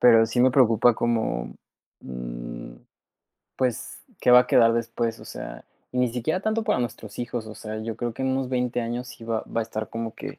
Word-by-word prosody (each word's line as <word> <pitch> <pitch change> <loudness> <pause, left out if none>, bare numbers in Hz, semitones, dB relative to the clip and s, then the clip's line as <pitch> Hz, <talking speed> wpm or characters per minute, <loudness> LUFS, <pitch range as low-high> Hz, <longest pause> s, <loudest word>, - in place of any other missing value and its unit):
pero 115 -2 +7
sí 120 +2 0
me 130 - +6
preocupa 120 -2 +5
como, 110 - -1 0.5
mm, - - -7 0.8
pues, 125 -3 -2 0.2
¿qué 125 - +4
va 125 0 +10
a - - 0
quedar 115 -1 +5
después? 115 0 -1
O - - -11
sea, - - -8 0.3
y 125 - -2
ni 125 -1 +3
siquiera 155 +10 -1
tanto 220 +1 0
para 210 - +2
nuestros 110 -3 -5
hijos, 120 -2 -3
o 110 - -8
sea, 110 0 -6
yo 115 0 -4
creo 120 -1 -2
que - - -4
en 130 - +1
unos 130 -1 0
20 125 -1 0
años 120 +2 -3
sí 115 - -11
va 115 -1 -1
va 115 - -2
a - - +2
estar 110 -1 -4
como 115 -1 -4
que - - -7
115 Hz, 215 wpm, -25 LUFS, 110-125 Hz, 0.8 s, va